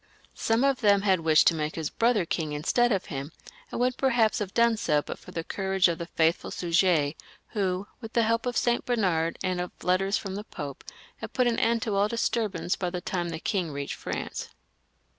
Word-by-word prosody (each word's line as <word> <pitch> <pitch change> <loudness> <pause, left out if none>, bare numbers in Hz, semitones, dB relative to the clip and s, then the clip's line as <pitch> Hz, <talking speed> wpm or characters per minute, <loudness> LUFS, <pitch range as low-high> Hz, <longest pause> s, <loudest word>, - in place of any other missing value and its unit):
Some 225 +3 +1
of 275 -2 +2
them 200 -2 +4
had 190 -3 +3
wished 160 -1 +4
to - - +6
make 155 -1 -3
his 160 -3 -3
brother 230 -5 +2
king 160 -2 -2
instead 240 +11 +2
of 195 -3 0
him, 140 +2 -5 0.4
and - - -4
would 250 +1 +1
perhaps 235 -5 +2
have 200 -3 -3
done 235 +1 +3
so 150 -8 +1
but - - -7
for - - -14
the 165 - -4
courage 190 +1 +1
of 170 -1 -2
the 170 - -5
faithful 165 0 +1
Suger, 170 -4 +2 0.4
who, 190 -2 -1
with 225 -2 -9
the 235 - +3
help 230 +2 +1
of 245 - -1
St. 240 0 +1
Bernard 180 -9 0
and 185 -1 0
of 180 - -5
letters 190 +3 +2
from 195 -2 -5
the 205 +2 -4
Pope, 145 -9 -7 0.3
had - - -8
put 255 - +2
an 235 -1 +1
end 230 0 +2
to 220 -4 -2
all 200 +1 +3
disturbance 220 -4 -1
by 180 - -2
the 180 0 -4
time 175 -1 -2
the 165 - -4
king 180 -2 -1
reached 140 0 -4
France. - - -5
190 Hz, 215 wpm, -27 LUFS, 165-225 Hz, 0.4 s, to